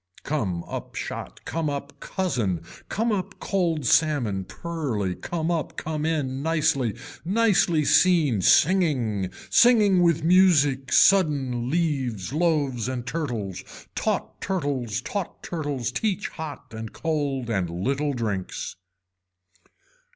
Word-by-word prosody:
Come 95 - -2
up - - -7
shot - - -6
come 160 -2 -2
up 140 0 -6
cousin, 115 - -1 0.3
come 225 +2 0
up 195 -3 -3
cold 170 -7 0
salmon 120 - +2
pearly, 135 - -3
come 165 - -3
up, 165 -3 -2
come 155 0 -2
in, 135 -5 -1
nicely, 145 -8 +1 0.3
nicely 185 -5 +2
seen, 155 - +4
singing, 130 - +3 0.2
singing 210 -6 +5
with 170 -2 +3
music, 155 -7 +4
sudden 140 -10 +3
leaves 135 - -1
loaves 145 -8 +1
and 125 -2 -4
turtles, 120 - -3 0.3
taught - - -2
turtles 140 - -2
taught 195 +7 -5
turtles 145 -8 -3
teach 205 -2 -1
hot 155 -7 -8
and 110 0 -7
cold 145 -6 -2
and 95 -5 0
little 135 - -1
drinks. 105 -7 -3
145 Hz, 115 wpm, -25 LUFS, 120-170 Hz, 0.3 s, singing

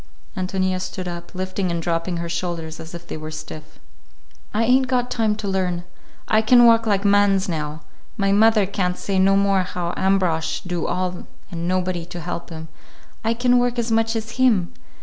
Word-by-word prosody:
Ántonia 185 -1 -1
stood 185 0 -5
up, 175 +1 -7
lifting 185 0 -2
and 170 -1 -1
dropping 165 +1 -1
her 170 0 -3
shoulders 170 -2 -4
as 160 +1 -8
if 170 0 -9
they - - -6
were 155 0 -7
stiff. 155 0 -9 0.7
"I 215 +2 +1
ain't 255 +3 +3
got 250 -1 0
time 220 -3 +1
to 210 -1 -5
learn. 180 -3 -1 0.4
I 215 - +4
can 240 +2 +6
work 230 -1 +5
like 200 -1 +1
mans 200 -1 +3
now. 155 -2 -4 0.3
My 195 -2 +1
mother 215 0 +5
can't 180 -2 -1
say 195 -1 -1
no 195 +1 +4
more 200 -1 +3
how 180 -1 -3
Ambrosch 185 -4 +1
do 175 -3 -3
all 180 0 -3 0.2
and 170 -1 -4
nobody 180 -2 -1
to 175 0 -7
help 175 0 -5
him. 160 -1 -8 0.6
I 225 +1 +1
can 245 +1 +3
work 245 0 0
as 235 -1 -1
much 225 0 +2
as 225 +1 -5
him. 215 -9 +3
185 Hz, 190 wpm, -22 LUFS, 175-215 Hz, 0.7 s, can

